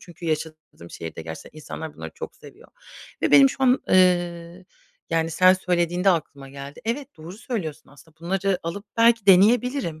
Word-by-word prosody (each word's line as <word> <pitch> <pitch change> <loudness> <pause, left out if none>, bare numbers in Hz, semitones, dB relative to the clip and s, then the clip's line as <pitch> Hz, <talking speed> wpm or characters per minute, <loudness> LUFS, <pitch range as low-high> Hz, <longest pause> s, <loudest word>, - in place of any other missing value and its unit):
çünkü 170 -1 -11
yaşadığım 155 - -5
şehirde 80 0 -8
gerçekten 80 - -10
insanlar 155 +1 -8
bunları - - -8
çok 470 0 -8
seviyor - - -16 0.5
ve - - +1
benim 275 -1 +7
şu - - -8
an, 255 0 +3
eee, 175 -1 +1 0.5
yani, 165 0 0
sen 185 +3 +5
söylediğinde 180 +1 +1
aklıma 140 -5 -3
geldi. 140 +1 -10
Evet, 265 - -4
doğru 160 +3 -10
söylüyorsun 200 - -6
aslında 155 +3 -20
bunları 190 +2 -1
alıp 175 +5 -6
belki 230 -2 +3
deneyebilirim. 210 - +3
175 Hz, 155 wpm, -23 LUFS, 155-200 Hz, 0.5 s, benim